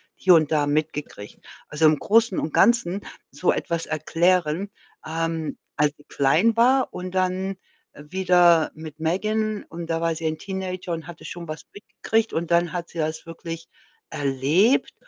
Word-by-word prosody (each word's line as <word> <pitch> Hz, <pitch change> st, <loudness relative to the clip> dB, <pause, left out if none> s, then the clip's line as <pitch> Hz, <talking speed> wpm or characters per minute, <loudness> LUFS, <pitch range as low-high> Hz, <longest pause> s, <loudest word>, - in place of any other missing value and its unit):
hier 185 Hz, -, +4 dB
und 155 Hz, -1 st, +2 dB
da 150 Hz, -2 st, +2 dB
mitgekriegt. 150 Hz, -8 st, -3 dB, 0.3 s
Also, 150 Hz, +1 st, +1 dB
im 155 Hz, -2 st, +3 dB
Großen 225 Hz, -2 st, +3 dB
und 155 Hz, -, -3 dB
Ganzen 205 Hz, -5 st, +3 dB, 0.3 s
so 180 Hz, -, +1 dB
etwas 170 Hz, -1 st, -2 dB
erklären 170 Hz, +3 st, +1 dB, 0.3 s
ähm, 165 Hz, 0 st, -2 dB, 0.2 s
als 150 Hz, 0 st, +2 dB
sie 145 Hz, -, -19 dB
klein 215 Hz, +12 st, +2 dB
war 260 Hz, +3 st, +4 dB
und 180 Hz, 0 st, -6 dB
dann 185 Hz, +1 st, -1 dB, 0.4 s
wieder 175 Hz, +1 st, +3 dB
mit 155 Hz, -1 st, -10 dB
Megan 215 Hz, +6 st, -1 dB
und 165 Hz, 0 st, -7 dB
da 165 Hz, 0 st, -1 dB
war 165 Hz, -1 st, 0 dB
sie 165 Hz, -, -6 dB
ein 155 Hz, 0 st, -2 dB
Teenager 185 Hz, -2 st, -4 dB
und 165 Hz, -1 st, -5 dB
hatte 170 Hz, -1 st, -11 dB
schon 170 Hz, -1 st, -7 dB
was 155 Hz, +1 st, -7 dB
mitgekriegt 225 Hz, +2 st, -2 dB
und 165 Hz, +1 st, -2 dB
dann 170 Hz, +1 st, +2 dB
hat 175 Hz, -1 st, -4 dB
sie -, -, -12 dB
das 155 Hz, +1 st, -2 dB
wirklich 165 Hz, 0 st, -7 dB, 0.4 s
erlebt 145 Hz, -, +2 dB
170 Hz, 160 wpm, -24 LUFS, 155-190 Hz, 0.4 s, hier